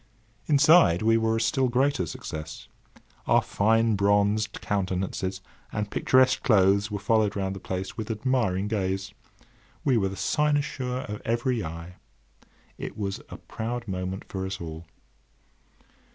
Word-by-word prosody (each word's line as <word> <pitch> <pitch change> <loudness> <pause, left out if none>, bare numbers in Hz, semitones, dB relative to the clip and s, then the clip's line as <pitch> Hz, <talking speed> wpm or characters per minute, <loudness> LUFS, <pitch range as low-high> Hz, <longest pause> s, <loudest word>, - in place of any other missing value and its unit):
Inside 145 - +5
we 115 +1 +4
were 110 0 +2
a - - 0
still 120 +4 +1
greater 125 -6 +1
success. 75 0 -7 0.6
Our - - +4
fine 115 +2 +2
bronzed 100 +2 +1
countenances 95 -1 -2 0.3
and 105 -1 -3
picturesque 130 0 +3
clothes 100 -2 +3
were 105 - -3
followed 105 0 +1
round 95 -1 -2
the - - -7
place 95 +1 -5
with 110 -1 -5
admiring 110 -4 0
gaze. 95 -2 -2 0.7
We 130 -4 +3
were 95 -3 +1
the 95 - -7
cynosure 140 -2 0
of 105 0 -6
every 120 0 0
eye. 85 +3 -8 0.8
It - - -6
was 100 -2 -3
a - - -8
proud 115 +1 -5
moment 95 0 -4
for 95 -1 -4
us 95 0 -5
all. 80 0 -8
105 Hz, 135 wpm, -26 LUFS, 95-120 Hz, 0.8 s, Inside